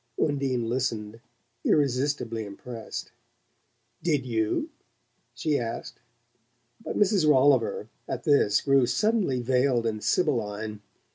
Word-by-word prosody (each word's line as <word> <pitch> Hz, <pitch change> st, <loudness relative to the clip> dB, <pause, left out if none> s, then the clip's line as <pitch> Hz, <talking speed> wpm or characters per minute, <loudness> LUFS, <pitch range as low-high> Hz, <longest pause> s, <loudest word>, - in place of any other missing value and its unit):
Undine 135 Hz, -5 st, 0 dB
listened, 115 Hz, -3 st, -2 dB, 0.4 s
irresistibly 135 Hz, -5 st, +1 dB
impressed. 110 Hz, +3 st, -7 dB, 0.9 s
"Did 150 Hz, -6 st, 0 dB
YOU?" 110 Hz, -3 st, -1 dB, 0.6 s
she 145 Hz, +4 st, 0 dB
asked; 115 Hz, -1 st, -5 dB, 0.8 s
but -, -, -4 dB
Mrs. 195 Hz, -6 st, +3 dB
Rolliver, 130 Hz, -6 st, +3 dB, 0.2 s
at -, -, -4 dB
this, 140 Hz, -8 st, +3 dB
grew 135 Hz, -3 st, +3 dB
suddenly 190 Hz, -, +1 dB
veiled 125 Hz, -1 st, +2 dB
and 110 Hz, -2 st, -2 dB
sibylline. 110 Hz, -, -1 dB
125 Hz, 95 wpm, -27 LUFS, 115-145 Hz, 0.9 s, Mrs